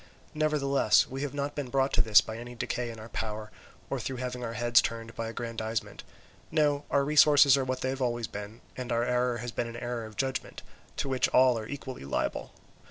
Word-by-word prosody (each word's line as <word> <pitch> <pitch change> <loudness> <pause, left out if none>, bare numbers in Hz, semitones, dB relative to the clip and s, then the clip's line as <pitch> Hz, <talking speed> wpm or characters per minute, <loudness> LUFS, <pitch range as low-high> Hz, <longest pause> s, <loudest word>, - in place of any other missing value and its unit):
Nevertheless, 140 -7 +3
we 135 +1 -5
have 145 0 -3
not 145 0 -2
been 145 -4 -4
brought 135 +1 +1
to - - +4
this 110 -3 +6
by 110 - -7
any 120 +1 -8
decay 120 0 -3
in 115 -1 -8
our 110 +1 -10
power, 110 -1 -4 0.4
or - - -2
through 135 - -4
having 125 0 -4
our 115 -1 -4
heads 120 +2 +4
turned 115 0 -5
by 115 - -3
aggrandizement; 115 -1 -4 0.5
no, 150 -2 +1
our 140 -1 +2
resources 145 -2 +6
are 135 - +1
what 130 0 -3
they 130 - 0
have 135 0 -3
always 120 -2 0
been, 105 +2 -8
and 125 -1 -5
our 115 0 +2
error 125 0 +1
has 120 +1 -5
been 120 - -2
an 115 0 -7
error 120 -1 -4
of 110 - -14
judgment, 130 -1 -3 0.3
to - - -1
which 130 -1 +1
all 130 -1 +5
are 110 - -7
equally 130 - -7
liable. 70 - -2
125 Hz, 215 wpm, -29 LUFS, 115-135 Hz, 0.5 s, this